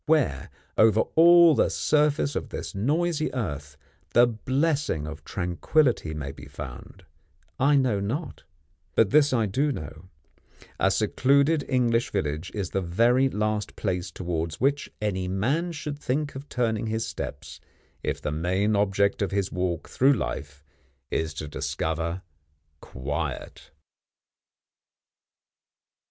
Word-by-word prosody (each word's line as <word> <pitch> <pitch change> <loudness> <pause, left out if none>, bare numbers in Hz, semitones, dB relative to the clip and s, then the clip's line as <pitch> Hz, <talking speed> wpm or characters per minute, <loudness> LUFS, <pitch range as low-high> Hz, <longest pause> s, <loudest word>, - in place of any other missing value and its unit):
Where, 140 - +1 0.3
over 110 0 +6
all 170 0 +8
the - - +2
surface 150 -2 +1
of - - -3
this - - -6
noisy 155 - 0
earth, 75 - -4 0.4
the 120 +1 +8
blessing 130 - 0
of 80 0 -8
tranquility 90 - 0
may 70 -2 -4
be 70 0 -12
found, 70 -3 -9 0.5
I 145 +2 +4
know 130 -7 +2
not; 125 - -4 0.5
but 105 -3 +4
this 150 -1 +5
I 115 -4 +2
do 135 +9 0
know: 80 - -7 0.7
a - - +4
secluded 140 +3 +2
English 120 -3 +2
village 80 -3 -2
is 100 -4 -3
the 95 - 0
very 120 +9 +3
last 105 -2 -2
place 90 -3 -2
towards 85 -3 -4
which 140 +2 +1
any 95 -3 -1
man 135 - 0
should 150 -2 -5
think 145 +2 -2
of 135 +2 -9
turning 115 -3 -1
his 110 +1 -1
steps, 80 -9 -7 0.4
if - - -2
the - - -3
main 95 +7 0
object 100 0 +1
of 100 - +1
his 100 -1 -1
walk 90 -2 -2
through 135 +2 +3
life 70 - -4 0.5
is 80 -1 -1
to 80 -1 -5
discover 80 +4 -3 0.6
quiet. 65 +3 -5
105 Hz, 130 wpm, -26 LUFS, 85-140 Hz, 0.7 s, all